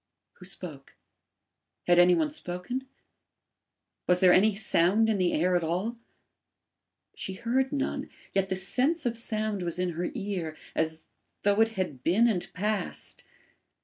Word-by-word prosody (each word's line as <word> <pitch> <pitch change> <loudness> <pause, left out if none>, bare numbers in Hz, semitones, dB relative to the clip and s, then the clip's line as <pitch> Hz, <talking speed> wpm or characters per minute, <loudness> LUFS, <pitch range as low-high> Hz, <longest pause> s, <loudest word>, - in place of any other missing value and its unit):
Who 180 - -10
spoke? 165 -7 -8 0.9
Had 175 0 +5
any 175 0 +7
one 305 -2 +1
spoken? 250 - -5 1.2
Was 180 0 +4
there 180 -1 +6
any 205 +2 +4
sound 205 +2 +3
in 210 -3 +1
the 180 -1 +2
air 180 +3 +2
at 175 - +2
all? 190 +9 -2 1.1
She 190 - -5
heard 255 +7 0
none, 280 -2 -2 0.2
yet 195 0 +1
the 190 - 0
sense 260 - 0
of 235 -1 0
sound 215 -3 -1
was 170 -1 -2
in 180 0 0
her 175 +1 -2
ear, 190 -8 -3 0.2
as 160 0 -2 0.4
though 205 +2 +3
it 225 0 +3
had 150 -9 -3
been 210 +10 +4
and 195 -7 -1
passed. 210 +2 -3
190 Hz, 145 wpm, -28 LUFS, 175-225 Hz, 1.2 s, any